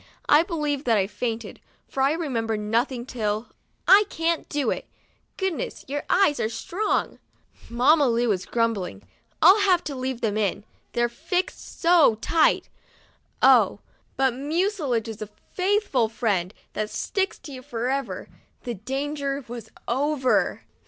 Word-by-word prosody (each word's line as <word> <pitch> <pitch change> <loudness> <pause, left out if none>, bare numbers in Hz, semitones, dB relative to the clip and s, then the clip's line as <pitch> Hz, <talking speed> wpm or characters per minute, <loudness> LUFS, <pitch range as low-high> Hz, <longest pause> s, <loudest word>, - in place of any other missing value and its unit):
I 295 - +7
believe 300 -5 -2
that 230 -3 +3
I 195 - +2
fainted, 225 +2 -4 0.3
for 270 - -3
I 275 +2 +4
remember 235 -9 -1
nothing 235 +4 -1
till, 220 -3 -2 0.4
"I 410 +2 +8
can't 330 0 -1
do 290 -2 0
it. - - -4 0.5
Goodness, 380 -5 -3
your 290 +2 -2
THURSDAY— - - -27
SPANKED 390 +2 +5
eyes 295 - -2
are 220 - 0
strong.'* 360 - -2 0.5
Mamma 270 +5 +4
Lu 240 0 +2
was 190 -4 0
grumbling, 220 - -1 0.2
" - - -41
I'll 375 +6 +8
have 370 -4 +3
to 285 - -5
leave 255 -1 -3
them 215 -2 0
in, 205 -1 0 0.3
they're 240 0 +2
fixed 335 +9 -4
so 335 -9 +5
tight." 315 +9 +2 0.8
Oh! - - +6 0.4
but 265 -2 +3
mucilage 290 - -1
is 220 -1 -7
a 215 - -5 0.2
faithful 370 - +1
friend, 205 -5 -1 0.2
that 215 0 -2
sticks 390 - -2
to 290 - -11
you 260 -2 -8
forever! 250 +2 -3 0.4
The 240 - -3
danger 275 +5 -3
was 230 -2 -8 0.2
over. 270 +1 +1
260 Hz, 150 wpm, -25 LUFS, 225-315 Hz, 0.8 s, I